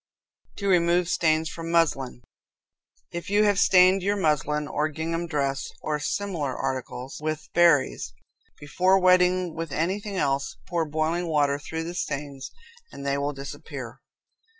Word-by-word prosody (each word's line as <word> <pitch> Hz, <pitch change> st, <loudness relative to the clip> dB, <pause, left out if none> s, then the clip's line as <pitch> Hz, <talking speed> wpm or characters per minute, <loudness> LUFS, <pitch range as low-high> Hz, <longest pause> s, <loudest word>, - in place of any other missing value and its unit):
To 200 Hz, -, -4 dB
Remove 175 Hz, -1 st, +3 dB
Stains 160 Hz, -2 st, +2 dB
from 165 Hz, +1 st, -6 dB
Muslin. 135 Hz, -7 st, +1 dB, 0.9 s
If 170 Hz, +1 st, -6 dB
you 205 Hz, +1 st, +4 dB
have 205 Hz, -2 st, +3 dB
stained 185 Hz, 0 st, +5 dB
your 200 Hz, +2 st, +1 dB
muslin 150 Hz, -4 st, 0 dB
or 150 Hz, +2 st, -1 dB
gingham 165 Hz, +2 st, -3 dB
dress, 140 Hz, -4 st, -1 dB
or 150 Hz, -1 st, -1 dB
similar 155 Hz, -5 st, -2 dB
articles, 130 Hz, 0 st, -4 dB
with 155 Hz, 0 st, -3 dB
berries, 170 Hz, -5 st, +3 dB, 0.5 s
before 185 Hz, +6 st, +2 dB
wetting 180 Hz, -1 st, +3 dB
with 165 Hz, -2 st, -5 dB
anything 195 Hz, +6 st, -2 dB
else, 140 Hz, -3 st, -1 dB
pour 170 Hz, -2 st, 0 dB
boiling 160 Hz, +3 st, -1 dB
water 145 Hz, -3 st, +1 dB
through 160 Hz, +2 st, -5 dB
the 170 Hz, +1 st, -5 dB
stains 140 Hz, -5 st, -4 dB, 0.4 s
and 140 Hz, -, -9 dB
they 140 Hz, 0 st, +1 dB
will 140 Hz, +1 st, -1 dB
disappear. 135 Hz, 0 st, -8 dB
160 Hz, 140 wpm, -26 LUFS, 145-180 Hz, 0.9 s, stained